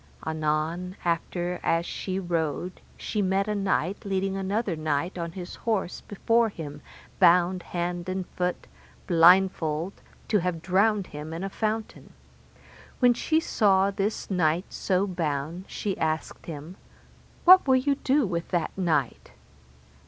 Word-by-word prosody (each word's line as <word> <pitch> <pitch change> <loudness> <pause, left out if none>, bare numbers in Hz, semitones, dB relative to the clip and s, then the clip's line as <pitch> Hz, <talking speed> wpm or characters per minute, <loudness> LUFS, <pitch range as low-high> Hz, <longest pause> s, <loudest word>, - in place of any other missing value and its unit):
Anon 160 +3 -1
after 175 +1 -1
as 165 +1 +1
she 185 +1 -4
rode 175 -1 -2 0.2
she 210 - -2
met 195 +1 +1
a 210 - 0
knight 195 -2 -1
leading 195 -1 -1
another 195 0 -1
knight 155 +3 -1
on 170 -2 -4
his 180 -1 -7
horse 215 -6 -2
before 230 +3 +1
him, 150 -6 -8 0.4
bound 180 +1 +5
hand 175 0 -3
and 185 0 -2
foot, 180 0 -2 0.4
blindfold, 170 -1 +4 0.3
to 210 - +3
have 170 -2 -2
drowned 200 +2 +2
him 150 0 -8
in 165 +3 -5
a 195 - -4
fountain. 220 +1 -3 0.8
When 245 -2 +5
she 315 +6 +1
saw 200 -9 +3
this 200 +1 -3
knight 175 0 +1
so 190 0 0
bound, 165 -1 -3
she 200 -3 -3
asked 155 0 -2
him, 160 +3 -8 0.7
What 370 -3 +8
will 260 - +5
ye 270 +2 +2
do 275 0 +1
with 170 -3 -3
that 175 -3 -2
knight? 160 -9 -1
180 Hz, 140 wpm, -26 LUFS, 165-200 Hz, 0.8 s, What